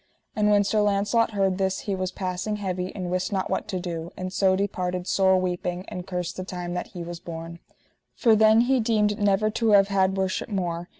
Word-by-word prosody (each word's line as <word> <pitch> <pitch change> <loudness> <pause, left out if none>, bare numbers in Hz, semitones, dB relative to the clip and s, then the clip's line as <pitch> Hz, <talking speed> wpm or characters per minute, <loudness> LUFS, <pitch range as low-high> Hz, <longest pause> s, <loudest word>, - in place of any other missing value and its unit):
And 210 -1 +2
when 205 -1 +4
Sir 210 +1 +1
Launcelot 210 +3 +1
heard 195 -2 +1
this 190 0 0
he 200 - -3
was 185 -1 -2
passing 185 +3 -3
heavy 185 -2 -3
and 180 -3 -4
wist 185 0 -1
not 190 -2 -2
what - - -1
to 190 -4 -3
do, 170 -2 -5
and 185 0 -5
so 190 -1 +3
departed 180 -2 -2
sore 190 -1 +3
weeping, 180 0 -3
and 180 0 -7
cursed 180 -2 -4
the 185 - -3
time 180 -1 -5
that 180 - -3
he 175 - -4
was 170 0 -7
born. 170 0 -8 0.6
For 230 -3 +4
then 220 +1 +6
he 260 +2 +2
deemed 215 -2 +1
never 205 +1 +2
to 225 +1 0
have 200 0 +6
had 190 -1 +2
worship 190 +2 -1
more. 175 -4 -3
190 Hz, 215 wpm, -25 LUFS, 180-205 Hz, 0.6 s, then